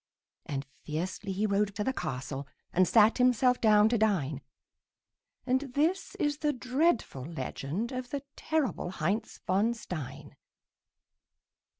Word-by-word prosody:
And 140 -1 -3 0.2
fiercely 185 +6 -3
he 200 +3 0
rode 200 0 +1
to 210 - -1
the 265 - 0
castle 135 - -4 0.3
And 185 0 +4
sat 220 +2 +5
himself 250 0 +4
down 210 -1 +6
to 235 -1 +1
dine; 155 -10 +1 1.0
And 260 +1 +2
this 330 +7 +1
is 295 0 0
the 300 -1 +2
dreadful 255 - 0
legend 160 - -4
Of 255 -1 -4
the 285 0 -3
terrible 310 - -1
Heinz 190 +5 -2
von 210 +5 +2
Stein. 160 - -7
210 Hz, 125 wpm, -30 LUFS, 170-255 Hz, 1.0 s, down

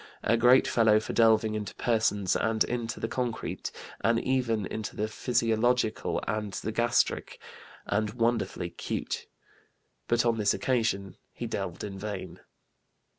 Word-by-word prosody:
A 115 - +3
great 120 +3 +5
fellow 110 -2 +4
for 110 - -5
delving 110 -1 +4
into 105 -3 -4
persons 110 -5 +1
and 110 -1 +2
into 120 -1 -3
the - - -2
concrete, 120 -1 -3 0.3
and 115 0 +3
even 120 -5 0
into 110 +3 -5
the 105 - -1
physiological 115 0 +1
and 105 -2 -2
the 110 - -3
gastric, 120 +1 +1 0.5
and 105 +1 0
wonderfully 115 -7 0
cute." - - -4 0.8
But 120 +1 +2
on 115 -1 +2
this 105 -1 +3
occasion 110 -7 -1
he - - -6
delved - - -4
in 100 -2 -6
vain. 100 -2 -6
110 Hz, 135 wpm, -28 LUFS, 105-120 Hz, 0.8 s, great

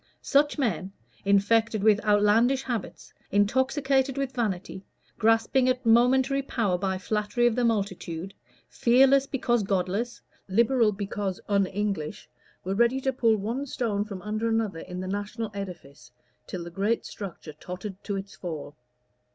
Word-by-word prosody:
Such 290 +2 +3
men, 195 - -1 0.3
infected 210 +2 +3
with 215 0 +4
outlandish 215 +5 +3
habits, 235 -7 -5 0.2
intoxicated 265 +5 +2
with 275 -1 -2
vanity, 195 -5 -3 0.4
grasping 225 +3 +3
at 255 0 -1
momentary 255 +4 +4
power 225 -8 0
by 190 0 -1
flattery 210 +5 0
of 240 -2 +3
the 245 - +1
multitude, 195 -5 -2 0.3
fearless 265 +3 +4
because 240 -4 +1
godless, 200 +4 -1 0.3
Liberal 230 +2 +3
because 200 -1 -3
un 200 -2 +2
English, 195 -5 -3 0.4
were 190 - -2
ready 235 +5 +3
to 265 0 -1
pull 230 -3 +3
one 235 +8 -3
stone 220 -6 -1
from 200 -4 -8
under 215 +2 -2
another 220 -6 0
in 180 +2 -7
the 185 - -5
national 205 +3 -4
edifice, 180 -8 -8 0.4
till 180 -2 -5
the 170 - -8
great 205 +6 0
structure 180 -6 -8
tottered 180 +5 -8
to 200 - -3
its 195 0 -6
fall. 155 -5 -6
210 Hz, 145 wpm, -27 LUFS, 195-240 Hz, 0.4 s, with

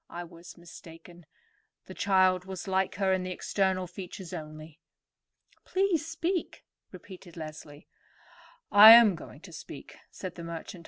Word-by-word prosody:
I 175 - -7
was 170 0 -14
mistaken. 170 -1 -15 0.6
The - - -11
child 185 -2 +2
was 190 0 -8
like 190 0 -1
her 190 -1 0
in 185 - -1
the 185 - -5
external 185 0 -1
features 180 0 -10
only." 155 -1 -10 0.8
"Please 370 -5 -1
speak," 335 +2 -4 0.3
repeated 185 -1 -13
Leslie. 155 -2 -10 0.8
"I 215 +2 +10
am 230 -4 +7
going 170 - -12
to - - -14
speak," - - -11
said 185 -2 -8
the 170 - -10
merchant. 170 +3 -8
185 Hz, 140 wpm, -28 LUFS, 170-195 Hz, 0.8 s, I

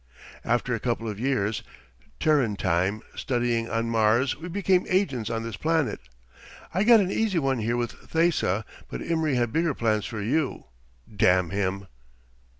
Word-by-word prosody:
After 120 +1 0
a 115 - -1
couple 115 -1 -2
of 105 -2 -5
years, 115 -4 0 0.6
Terran 145 -9 +2
time, 95 +4 0
studying 120 -2 -1
on 115 0 -1
Mars 115 +4 +3
we 165 +3 -8
became 185 0 +1
agents 140 - 0
on 115 -1 -2
this 115 0 -5
planet. 160 -3 0 0.7
I 185 +4 +2
got 230 -1 +7
an 190 -1 -1
easy 215 -4 0
one 135 -5 +1
here 115 +2 0
with 120 -1 -1 0.2
Thesa, 160 - +1 0.2
but - - -5
Imry 160 -4 0
had 120 -2 0
bigger 165 -3 +1
plans 110 -3 0
for 110 - -5
you. 135 +8 -1 0.5
Damn 90 -3 +3
him!" 100 0 -1
120 Hz, 155 wpm, -26 LUFS, 110-160 Hz, 0.7 s, got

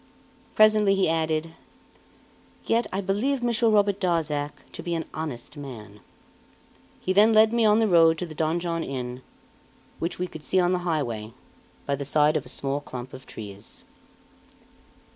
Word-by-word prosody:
Presently 215 -2 +5
he 195 - +2
added: 160 0 -1 1.1
"Yet 230 +1 +1
I 195 - -2
believe 235 +8 -1
Monsieur 235 -1 +2
Robert 205 -2 +2
Darzac 155 -5 -1
to - - -8
be 170 -1 -3
an 165 - -3
honest 150 -3 -6
man." 110 -7 -9 1.0
He 185 - -1
then 215 +3 +6
led 220 +1 +5
me 235 -1 +3
on 210 0 +5
the 225 -1 +3
road 165 -3 +5
to 180 - -3
the 160 - -9
Donjon 165 +2 -1
Inn, 125 -2 -5 0.8
which 170 +2 -3
we 180 - -2
could 160 -4 -10
see 190 - +2
on 175 0 +2
the 180 - +1
highway, 115 -8 -2 0.5
by 140 - 0
the 140 - -5
side 150 +2 +3
of 140 - -2
a - - -3
small 140 +2 -1
clump 130 -2 -8
of 130 - -11
trees. 100 -1 -10
165 Hz, 160 wpm, -25 LUFS, 140-200 Hz, 1.1 s, then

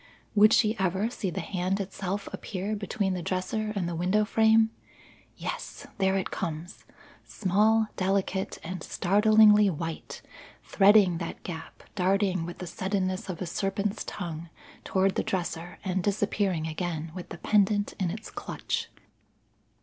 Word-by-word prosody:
Would 215 +1 +7
she 220 -1 +4
ever 190 +4 0
see 195 - -3
the 175 - -3
hand 185 +1 -1
itself 195 0 -4
appear 200 +2 -3
between 200 -1 -1
the 180 - -3
dresser 195 +5 -2
and 185 -4 -1
the 175 - -3
window 185 +6 +2
frame? 220 +1 +4 0.7
Yes, - - -5
there 190 0 +3
it 190 - -3
comes, 165 +2 -5 0.4
small, 215 +3 +2
delicate, 190 0 0
and 180 +1 -5
startlingly 210 +3 +5
white, 165 -1 -5 0.4
threading 195 -4 +5
that 170 - -6
gap 160 -3 -8
darting 185 -2 +1
with 175 - -7
the 180 - -6
suddenness 185 +3 -2
of 185 0 -4
a - - -3
serpent's 200 +4 -2
tongue 170 -3 -6 0.3
toward 190 0 +2
the - - 0
dresser 175 -1 -3
and 190 0 0
disappearing 200 -4 0
again 160 0 -3
with 180 -1 -8
the 170 - -7
pendant 205 +2 +2
in 185 -3 +1
its 215 +6 -6
clutch. - - -4
190 Hz, 140 wpm, -28 LUFS, 175-205 Hz, 0.7 s, Would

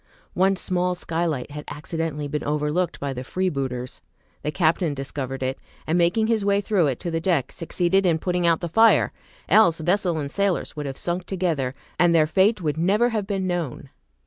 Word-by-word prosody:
One 190 +2 +3
small 180 -1 -1
skylight 160 -6 -2
had 150 0 -6
accidentally 150 0 -4
been 150 +1 -3
overlooked 150 +4 -1
by 140 -1 -3
the 125 0 -5
freebooters. 135 -7 -3 0.4
The - - -2
captain 160 0 +1
discovered 135 -1 -4
it, 130 +1 -2 0.3
and 160 - 0
making 175 +6 +3
his 220 -2 +1
way 200 0 +3
through 200 -5 +2
it 130 -3 -2
to 175 - -3
the 165 0 -1
deck, 165 -8 +1
succeeded 175 +3 +1
in 170 -4 +3
putting 180 +1 0
out 165 -1 +3
the 175 - -2
fire, 225 +7 +4 0.4
else 175 -7 +5
vessel 175 +1 +1
and 140 -2 -3
sailors 200 0 -1
would 150 -1 -4
have 135 - -5
sunk 175 +1 -2
together, 165 -9 -1 0.2
and 175 -1 +4
their 155 -2 +5
fate 190 +5 +2
would 155 0 -1
never 205 +8 +3
have 215 -4 -2
been 195 -2 -1
known. 170 -7 -3
170 Hz, 190 wpm, -24 LUFS, 150-185 Hz, 0.4 s, else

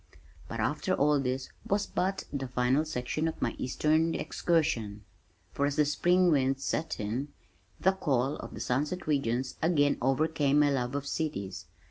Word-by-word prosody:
But - - -5
after - - 0
all 145 +1 +3
this 130 0 -2
was 200 +1 0
but 190 +2 -1
the 135 -2 -2
final 125 +4 +1
section 155 +2 -2
of 160 - -4
my - - 0
eastern 155 +5 +1
excursion 115 -12 0 0.5
for 140 - 0
as 145 - -2
the 150 - +4
spring 175 +4 +3
winds 135 -2 +1
set 160 - -2
in, 115 +7 -2 0.5
the 190 - +4
call 140 -7 0
of - - -8
"the - - -6
sunset 150 +8 -1
regions" 130 -4 0
again 150 -4 +3
overcame 145 +2 +2
my 145 -1 +5
love 125 -1 -1
of 140 0 -2
cities. 140 - -3
145 Hz, 160 wpm, -30 LUFS, 130-160 Hz, 0.5 s, my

